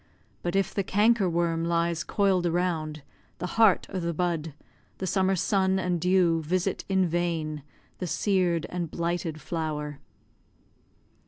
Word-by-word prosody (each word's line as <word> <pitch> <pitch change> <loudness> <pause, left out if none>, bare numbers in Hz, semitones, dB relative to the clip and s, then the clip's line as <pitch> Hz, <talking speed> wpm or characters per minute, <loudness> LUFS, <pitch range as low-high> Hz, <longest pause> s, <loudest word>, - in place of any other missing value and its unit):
But 175 +1 -2
if 195 -1 +1
the 200 - 0
canker 205 0 +3
worm 165 -1 0
lies 170 0 0
coil'd 190 -4 +2
around 165 -4 -1 0.3
The - - -4
heart 215 +1 +4
o' 190 - -1
the 170 -1 -2
bud, 165 -3 -1 0.4
the 190 - -3
summer 190 0 +2
sun 190 +1 +2
and 180 -3 -1
dew 180 -2 +3
Visit 185 +4 -1
in 190 -1 +3
vain 165 -3 -1 0.4
the 180 - -3
sear'd 180 -3 +1
and 175 -2 -3
blighted 170 -1 -2
flower. 150 -3 -4
175 Hz, 140 wpm, -27 LUFS, 165-190 Hz, 0.4 s, heart